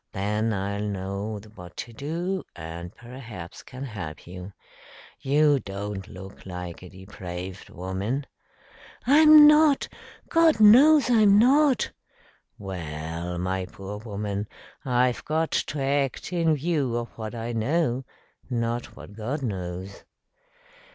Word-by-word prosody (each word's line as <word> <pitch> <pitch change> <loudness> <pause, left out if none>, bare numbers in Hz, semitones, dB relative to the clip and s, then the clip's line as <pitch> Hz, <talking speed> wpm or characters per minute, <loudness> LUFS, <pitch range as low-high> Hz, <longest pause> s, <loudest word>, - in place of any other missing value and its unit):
Then 105 +3 0
I'll 100 0 -2
know 100 +1 -3
what 90 -3 -12
to 120 - -6
do, 170 +9 -3
and 85 +1 -7
perhaps 115 -8 -10
can 130 +2 -9
help 100 - -7
you. 90 +2 -9 0.7
You 145 +1 +3
don't 100 -1 -6
look 95 +2 -11
like 90 -2 -7
a 90 - -11
depraved 95 -1 -8
woman." 95 +10 -3 0.8
"I'm 305 +3 +8
not. 300 -1 +5 0.4
God 330 -4 +4
knows 270 +8 +7
I'm 210 -4 +6
not!" 270 +3 +4 0.7
"Well, 85 -2 -5
my 95 +1 -2
poor 95 +5 -8
woman, 105 -1 -4 0.4
I've 125 -2 +1
got 160 +1 -1
to 145 - -1
act 140 +3 -1
in 165 -3 +2
view 145 -5 0
of 120 0 -4
what 110 0 -7
I 115 +1 -4
know, 130 +2 0 0.5
not 120 -1 -2
what - - -11
God 125 +7 -4
knows." 95 -3 -5
110 Hz, 120 wpm, -26 LUFS, 95-150 Hz, 0.8 s, I'm